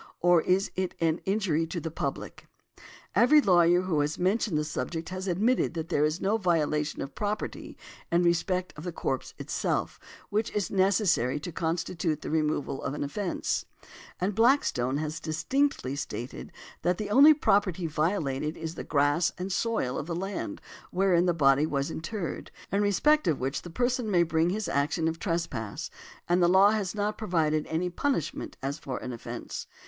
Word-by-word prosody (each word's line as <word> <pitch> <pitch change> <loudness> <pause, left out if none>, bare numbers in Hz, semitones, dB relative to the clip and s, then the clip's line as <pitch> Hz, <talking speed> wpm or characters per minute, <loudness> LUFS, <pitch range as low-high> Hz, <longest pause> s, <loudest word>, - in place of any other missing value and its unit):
Or 175 -1 +5
is 185 +4 +1
it 185 -1 -2
an 165 0 +1
injury 190 -6 +1
to 170 - -4
the 160 0 -5
public? 140 -3 -5 0.7
Every 245 +9 +6
lawyer 175 - +4
who 180 -5 0
has 145 +1 0
mentioned 190 -1 +1
the 150 - +1
subject 160 +2 -4
has 185 +1 -5
admitted 205 +3 +1
that 165 0 -4
there 150 -4 +2
is 155 +3 +1
no 205 +3 +1
violation 155 -5 0
of 135 - -8
property 210 0 -4 0.3
in 170 +1 +3
respect 180 +2 +1
of 150 - -9
the 175 - -3
corpse 135 -5 -3
itself, - - -2 0.3
which 215 +2 0
is 205 -3 -1
necessary 185 - +2
to 175 - -5
constitute 165 -1 -2
the - - -4
removal 150 -3 -1
an 145 - -3
offence; 175 +6 -2 0.5
and 190 +3 0
Blackstone 190 - +2
has 155 +1 -3
distinctly 160 - 0
stated 125 -3 -6 0.3
that 175 0 +1
the 210 -1 -4
only 290 +7 +8
property 195 - +1
violated 155 -2 -1
is 160 0 -5
the - - -6
grass 145 +4 +2
and 185 +2 -4
soil 200 - -1
of 150 - -6
the 170 - -3
land 195 +3 -4 0.3
wherein 180 -2 +2
the - - +4
body 145 -2 +3
was 140 0 -1
interred, 175 +2 -5 0.2
in 200 +2 +2
respect 295 - +3
of 155 -4 +1
which 135 +2 -2
the 175 - -9
person 245 +4 0
may 175 -4 +4
bring 165 0 +1
his 205 +1 -2
action 160 +1 0
of 165 0 -2
trespass, 165 - -3 0.4
and 175 +1 +3
the 175 - +5
law 190 +3 +6
has 210 -3 -1
not 210 0 -2
provided 160 -7 0
any 165 +3 -1
punishment 170 - -2
as 140 +3 -3
for 130 -4 -5
an 125 - -6
offence. 115 - -6
170 Hz, 175 wpm, -28 LUFS, 155-195 Hz, 0.7 s, only